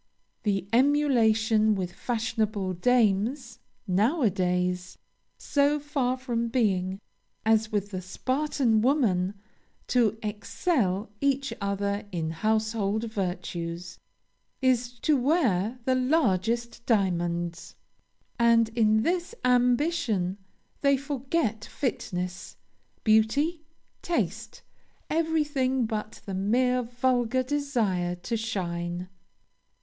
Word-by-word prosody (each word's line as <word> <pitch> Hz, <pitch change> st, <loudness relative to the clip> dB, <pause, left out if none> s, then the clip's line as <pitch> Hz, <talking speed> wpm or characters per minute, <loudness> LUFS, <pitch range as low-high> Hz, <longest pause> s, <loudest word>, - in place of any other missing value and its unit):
The 195 Hz, -3 st, -1 dB
emulation 225 Hz, -6 st, +3 dB
with 180 Hz, -2 st, -3 dB
fashionable 220 Hz, -3 st, -1 dB
dames, 230 Hz, +4 st, +1 dB, 0.3 s
now 225 Hz, -, +2 dB
a 215 Hz, -, +4 dB
days, 180 Hz, 0 st, -1 dB, 0.4 s
so 290 Hz, +1 st, +1 dB
far 275 Hz, -3 st, -1 dB
from 240 Hz, -3 st, -2 dB
being, 195 Hz, -6 st, 0 dB, 0.5 s
as 220 Hz, -1 st, +3 dB
with 205 Hz, -1 st, -1 dB
the 185 Hz, -2 st, -4 dB
Spartan 255 Hz, +3 st, 0 dB
women, 210 Hz, -8 st, +2 dB, 0.5 s
to 230 Hz, -4 st, +2 dB
excel 210 Hz, -, -1 dB
each 275 Hz, -1 st, +1 dB
other 200 Hz, +1 st, -2 dB
in 160 Hz, -3 st, -2 dB
household 215 Hz, +3 st, 0 dB
virtues, 175 Hz, -3 st, -4 dB, 0.6 s
is 245 Hz, -2 st, +1 dB
to 310 Hz, -, +3 dB
wear 245 Hz, -, +1 dB
the 260 Hz, -, +3 dB
largest 235 Hz, -, +1 dB
diamonds. 175 Hz, -5 st, 0 dB, 0.6 s
And, 230 Hz, -1 st, +4 dB
in 220 Hz, -1 st, +2 dB
this 350 Hz, -, -1 dB
ambition, 245 Hz, -, +2 dB, 0.4 s
they 280 Hz, -1 st, +4 dB
forget 270 Hz, -4 st, -2 dB
fitness, 180 Hz, -9 st, -4 dB, 0.5 s
beauty, 275 Hz, +10 st, +2 dB, 0.4 s
taste, 485 Hz, +7 st, -3 dB, 0.5 s
everything 295 Hz, -6 st, +1 dB
but 215 Hz, -1 st, -5 dB
the 195 Hz, -, -5 dB
mere 250 Hz, +6 st, +2 dB
vulgar 245 Hz, +1 st, 0 dB
desire 235 Hz, -11 st, 0 dB
to 180 Hz, +7 st, -4 dB
shine. 175 Hz, -5 st, -3 dB
225 Hz, 95 wpm, -27 LUFS, 195-260 Hz, 0.6 s, a